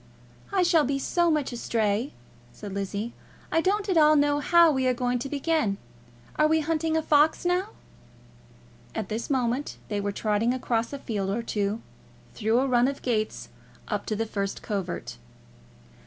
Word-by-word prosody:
"I 380 -2 +3
shall 340 -3 +4
be 275 +1 0
so 345 +5 +1
much 300 -5 0
astray," 225 0 0 0.4
said 190 +11 -8
Lizzie. 200 +3 -3 0.4
"I 325 - +3
don't 400 +3 0
at 375 -4 +1
all 305 0 +6
know 290 0 +3
how 340 +2 +5
we 265 -2 +1
are 255 - +2
going 245 0 0
to 275 - -5
begin. 290 -8 0 0.6
Are 305 - +5
we 315 0 +3
hunting 320 +1 0
a 320 - 0
fox 305 +3 +3
now?" 360 +3 +1 1.3
At 215 -4 -3
this 220 +2 -3
moment 260 0 -1
they 205 -1 -1
were 205 0 -1
trotting 215 +4 0
across 235 -2 -1
a 280 - -4
field 205 -7 -3
or 225 +4 -1
two, 210 0 -2 0.5
through 225 +3 +1
a 270 - +1
run 245 -1 +3
of 275 0 -4
gates 215 -4 -1 0.4
up - - -2
to 215 - -1
the 225 +2 -1
first 200 -2 -3
covert. 195 - -4
250 Hz, 170 wpm, -26 LUFS, 215-305 Hz, 1.3 s, all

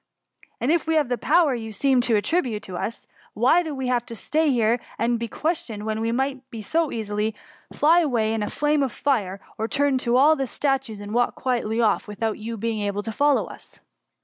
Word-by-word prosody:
And 255 - +1
if 335 -1 +1
we 320 - +2
have 300 -5 +2
the 245 - 0
po?M|^you 270 -8 +2
seem 260 +4 +2
to 240 -2 +2
attribute 225 -2 0
to 185 -4 -7
us, 225 +6 -4 0.3
why 250 +11 +4
do 315 -4 -5
we 265 -1 -3
^y 250 +5 0
here 235 -1 +2 0.2
to 235 +1 +1
be 235 - -3
questioned, 245 -8 -3
when 220 0 -2
we 225 0 0
might 265 +2 -1 0.2
so 320 +8 0
easily 215 -1 -2 0.4
fly 325 +4 +4
away 235 -9 +1
in 225 - -1
a 210 - -2
flame 295 0 +1
of 270 -3 0
fire, 205 -9 -1 0.2
or 220 - 0
turn 280 0 +1
you 240 +1 +2
all 300 +4 +6
to 270 -3 -2
statues, 270 -6 -1
and 205 +1 -7
walk 245 +1 +1
quietly 235 -3 -1
off 220 -2 +1
without 215 +1 -3
your 225 +1 -5
being 225 0 -2
able 205 0 -2
to 225 - -4
fol 285 +6 +3
low - - 0
us - - -13
240 Hz, 205 wpm, -24 LUFS, 220-285 Hz, 0.4 s, all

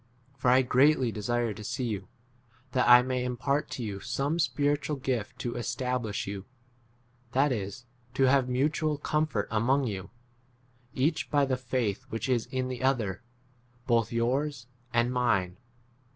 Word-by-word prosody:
For 130 -2 +1
I 130 +1 +6
greatly 130 0 +4
desire 115 +1 -1
to 105 +1 -9
see 120 +4 -3
you, 105 -6 -3 0.6
that 125 -1 +2
I 120 0 +9
may 130 -1 -1
impart 135 +4 -1
to 125 - -4
you 100 -3 -4
some 135 - -1
spiritual 145 -1 +1
12 135 - -13
gift 120 -6 -2
to 120 - -2
establish 120 -2 -2
you; 100 0 -6 0.9
that 140 +2 +3
is, 115 +2 -4 0.3
to 135 - +2
have 130 -1 +4
mutual 150 +4 +1
comfort 150 -8 -1
among 125 +6 +2
you, 100 -4 -4 0.9
each 150 +5 0
by 145 -2 +3
the 130 -1 0
faith 120 -5 -2
which 115 - -3
[is] 120 -3 +1
in 130 -1 -2
the 130 -1 -4
13 130 - +2
other, 115 -7 0 0.6
both 115 -3 +2
yours 125 +3 0 0.3
and 120 +1 +2
mine. 100 -8 +1
125 Hz, 155 wpm, -29 LUFS, 115-135 Hz, 0.9 s, I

